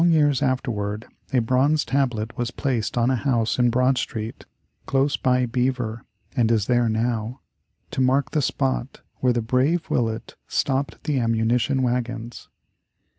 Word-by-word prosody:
Long 170 - +5
years 145 -5 +3
afterward 110 -5 -1 0.3
a 130 - +2
bronze 130 +6 +2
tablet 120 -5 -1
was 120 -1 -2
placed 125 -4 -2
on 120 +2 +3
a - - +2
house 120 -3 0
in 120 -1 +4
Broad 125 +2 +2
Street 110 -1 -5 0.4
close 135 +1 +2
by 125 -1 +2
Beaver 125 -1 -1 0.3
(and 115 -3 +2
is 110 -4 +2
there 120 -1 +2
now), 115 +2 -1 0.5
to - - -1
mark 135 +1 +2
the 150 - +1
spot 65 - -1 0.2
where 125 - +2
the 120 -1 0
brave 130 +8 +1
Willett 115 -2 -1
stopped 135 +1 -1
the 145 -3 0
ammunition 120 +3 +1
wagons. 120 -1 -3
125 Hz, 150 wpm, -23 LUFS, 115-135 Hz, 0.5 s, Long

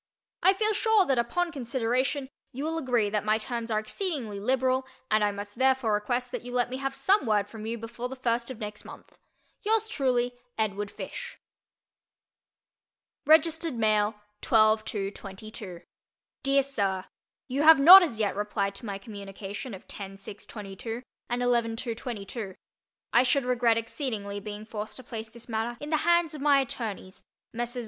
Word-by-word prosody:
I 375 +2 +6
feel 430 +2 +1
sure 430 -2 +4
that 265 -6 +2
upon 340 +9 0
consideration 260 +1 -1 0.2
you 270 +2 -5
will 325 +1 -1
agree 240 -8 +1
that 210 -1 0
my 215 +1 +3
terms 235 +1 -4
are 215 - +1
exceedingly 225 - -3
liberal 260 +3 +1 0.2
and 215 0 +4
I 205 - +2
must 205 +3 -8
therefore 260 -4 +3
request 245 +4 -1
that - - -3
you 245 - -8
let 245 0 0
me 260 - -3
have 270 0 -3
some 390 - +3
word 205 -2 +2
from 220 0 -8
you 230 +1 -2
before 235 +2 -6
the 265 - -6
first 235 -2 0
of 260 - -6
next 210 -1 -6
month. - - -13 0.5
Yours 440 +1 +1
truly, 250 - +1 0.2
EDWARD 205 -2 -1
FISH. - - -7 1.9
(Registered 320 -1 +4
Mail) 215 -1 +2 0.3
12 215 -1 +4
2 200 -2 -3
22 195 -2 -9 0.6
DEAR 275 -1 +3
SIR: 200 -9 -1 0.4
You 270 +2 -1
have 320 +1 +9
not 360 +7 +12
as 300 -11 -1
yet 205 -3 +1
replied 200 -1 -1
to 215 +4 -9
my 200 -1 -3
communication 200 +2 -7
of 185 - -14
10 195 -1 -8
6 200 +1 -10
22 220 +3 -6 0.3
and 245 +1 0
11 235 -2 +2
2 230 0 -3
22. 215 -4 -6 0.6
I 240 - +7
should 255 +1 +2
regret 240 -2 +3
exceedingly 220 -4 -3
being 210 +1 -7
forced 215 -1 -6
to 260 - -8
place 225 -2 -6
this 235 +1 -12
matter 230 +1 -2
in 295 +1 -6
the 310 - +4
hands 340 0 +3
of 300 - -7
my 285 -1 +5
attorneys, 220 -7 -4 0.3
Messrs. 240 +1 -2
235 Hz, 170 wpm, -28 LUFS, 210-265 Hz, 1.9 s, not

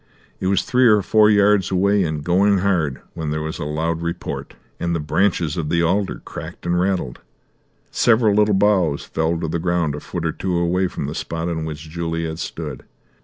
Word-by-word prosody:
It 95 - -2
was 100 +1 +2
three 125 0 +3
or 105 -3 +5
four 105 +2 +4
yards 100 -2 +4
away, 100 +2 +2
and 75 -3 -3
going 95 +4 +3
hard, 90 -8 0
when 80 -3 -4
there 75 +1 -2
was 80 0 -5
a - - -3
loud 80 +2 -2
report, 85 +1 -5 0.2
and 85 0 -1
the - - -1
branches 80 +1 0
of 80 -3 -2
the 85 0 +2
alder 95 +4 0
cracked - - -8
and 90 0 +1
rattled. 90 -9 -1 0.7
Several 110 -2 +3
little 105 0 +3
boughs 95 -7 +2
fell 80 +1 -1
to 80 - -2
the 85 +2 -2
ground 85 -3 0
a 75 - -5
foot 85 +1 -5
or 80 - +1
two 90 +2 -2
away 90 +2 +1
from 80 - -5
the 75 - -4
spot 85 0 -3
on 80 -2 -3
which 80 0 -7
Juliet 80 0 -3
stood. - - -6
85 Hz, 200 wpm, -21 LUFS, 80-100 Hz, 0.7 s, or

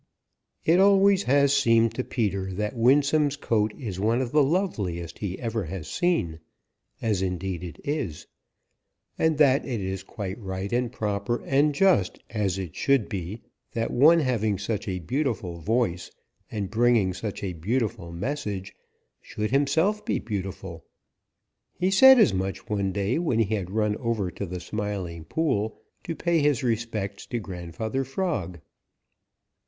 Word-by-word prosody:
It 170 +3 +5
always 195 0 +5
has 140 +1 +4
seemed 115 -4 +4
to 130 - -2
Peter 100 -6 -2
that 105 +4 -3
Winsome's 145 +4 +3
coat 110 -6 +1
is 105 -9 -5
one 115 +4 +2
of 125 -2 -2
the 150 +1 +4
loveliest 105 - -1
he 95 -3 -3
ever 115 -4 -3
has 85 0 -6
seen, 165 - 0 0.6
as 105 -5 +1
indeed 90 -1 -3
it 85 - -8
is, 140 - -3 0.9
and 160 -2 +2
that 140 -2 +4
it 120 -4 -3
is 95 0 -3
quite 95 +1 -6
right 95 0 -4
and 120 -1 0
proper 105 0 -2
and 145 +2 +2
just 180 - +3
as 100 -4 -1
it 95 -5 -6
should 135 -6 +2
be 95 +3 -5 0.3
that 115 0 -1
one 155 +7 +6
having 110 -7 0
such 105 +2 -3
a 95 -2 -2
beautiful 100 - -2
voice 90 -2 0 0.4
and 100 -3 -4
bringing 115 -4 +3
such 105 +2 -5
a 95 -2 -2
beautiful 95 0 -2
message 100 -1 -4 0.5
should 105 +1 -4
himself 160 +10 +2
be - - 0
beautiful. 95 -5 -5 0.9
He 185 +1 0
said 265 +7 +8
as 215 - +5
much 95 +3 -3
one 100 -3 -1
day 100 - 0
when 160 -10 0
he 110 -1 +1
had 95 -4 -2
run 105 +1 0
over 115 -7 -1
to 100 - -5
the 90 +1 -5
Smiling 95 -4 -4
Pool 110 - -1 0.3
to 165 - -3
pay 170 0 +1
his 145 -4 +2
respects 110 -4 -2
to 120 - -3
Grandfather 100 +5 -4
Frog. 135 - -3
110 Hz, 150 wpm, -26 LUFS, 95-135 Hz, 0.9 s, said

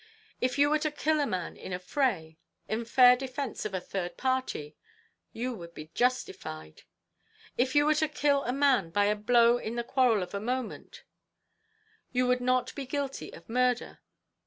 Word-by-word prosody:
If 255 +2 0
you 290 +1 +4
were 305 - +3
to 305 - 0
kill 305 +1 0
a 290 - +1
man 185 -4 -3
in - - -9
a 180 - -1
fray, 180 - -1 0.3
in 225 +2 -2
fair 250 +1 +7
defence 260 -1 -5
of 200 -3 -3
a - - 0
third 180 0 -5
party, 260 - -2 0.6
you 245 +2 -3
would 170 -6 -10
be 155 +1 -10
justified. 80 - -2 0.7
If 260 +3 0
you 290 0 +5
were 305 - +4
to 310 +1 +1
kill 280 -1 +1
a 245 - 0
man 270 -9 +2
by 205 +4 +2
a 210 +1 +2
blow 235 +2 +4
in 225 0 -5
the 235 - -1
quarrel 240 -5 +2
of 180 - -9
a 200 - -2
moment, 245 +2 -5 1.1
you 250 0 +1
would 250 0 +2
not 255 0 +1
be 275 -3 -6
guilty 280 0 -4
of 165 - -13
murder. 250 +1 0
245 Hz, 185 wpm, -29 LUFS, 205-265 Hz, 1.1 s, fair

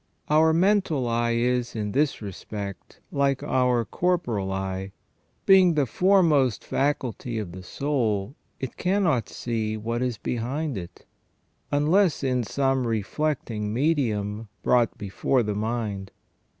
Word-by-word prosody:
Our 160 +1 +5
mental 170 -6 +2
eye 115 0 +1
is, 125 0 0
in 105 -2 -2
this 140 -2 0
respect, 100 0 -7
like 140 -1 +1
our 125 -2 +2
corporal 120 - -1
eyes; 95 0 -3 0.6
being 185 -3 +6
the 145 -2 +3
foremost 155 - +3
faculty 130 -4 -1
of 105 -5 -4
the 95 +2 -8
soul 115 -2 -1 0.3
it 130 - -5
cannot 180 - +1
see 110 -2 -2
what 115 +2 -3
is 125 -3 -1
behind 130 +7 -2
it, 85 -2 -8 0.7
unless 155 +3 +3
in 125 -2 +1
some 135 +1 0
reflecting 115 -1 -2
medium 115 -6 0 0.2
brought 120 -2 +2
before 105 +5 0
the 105 -1 -2
mind. 105 -2 -3
120 Hz, 125 wpm, -25 LUFS, 105-145 Hz, 0.7 s, being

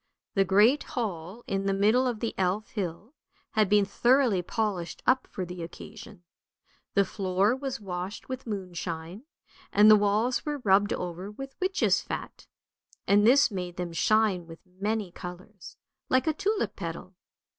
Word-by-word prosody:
The 195 - +4
great 210 - +5
hall 210 - -5
in 195 0 -2
the 195 - +1
middle 220 +6 +3
of 235 -4 -3
the 230 - -2
Elf 190 +3 -1
hill 200 - -5 0.4
had 215 -3 +2
been 205 -1 +4
thoroughly 240 -1 +3
polished 185 -3 -3
up 255 0 +3
for 185 - -5
the 180 0 -7
occasion. 200 +3 -10 0.7
The 200 -1 +4
floor 195 +3 +1
was 265 -2 -4
washed 185 0 -6
with 260 -1 -6
moonshine, 180 - -5 0.5
and 210 +1 +7
the - - +10
walls 210 +4 +1
were 295 -1 -2
rubbed 205 +1 +4
over 180 +2 -4
with 270 +6 -8
witches' 380 +1 +2
fat, - - -7 0.6
and 205 +2 +5
this 275 +1 +5
made 180 -3 -5
them 175 -2 -4
shine 205 -2 +2
with 165 -1 -13
many 200 +1 -3
colours, 180 +3 -10 0.3
like 255 0 +3
a 315 - +2
tulip 415 +7 -1
petal. - - -6
205 Hz, 155 wpm, -28 LUFS, 180-235 Hz, 0.7 s, the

